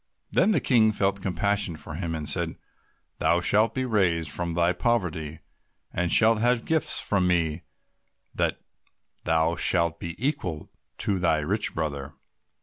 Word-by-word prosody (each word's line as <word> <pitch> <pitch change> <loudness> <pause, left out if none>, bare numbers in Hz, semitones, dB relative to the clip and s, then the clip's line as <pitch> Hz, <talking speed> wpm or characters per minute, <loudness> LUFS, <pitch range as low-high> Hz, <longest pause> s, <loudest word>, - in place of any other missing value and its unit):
Then - - +3
the 195 -8 +3
King 115 -4 +3
felt 100 -1 -1
compassion 95 0 0
for 80 0 -7
him, 80 0 -4
and 75 -2 -5
said, - - 0 0.6
"Thou 85 - +2
shalt 105 +6 +2
be 130 -1 -1
raised 90 -8 +1
from 85 -1 -3
thy 85 +1 +2
poverty, 85 -7 -2 0.5
and 90 -1 -1
shalt 115 0 +5
have 120 +1 +3
such - - -18
gifts 160 -1 +3
from 95 -3 +1
me 85 -2 0 0.7
that - - -1 0.7
thou 80 +1 +1
shalt 85 -1 +2
be 85 -1 -6
equal 105 - -3 0.3
to 100 -2 -1
thy 85 -3 +2
rich 100 +8 -1
brother." 70 -4 -4
90 Hz, 150 wpm, -25 LUFS, 80-105 Hz, 0.7 s, shalt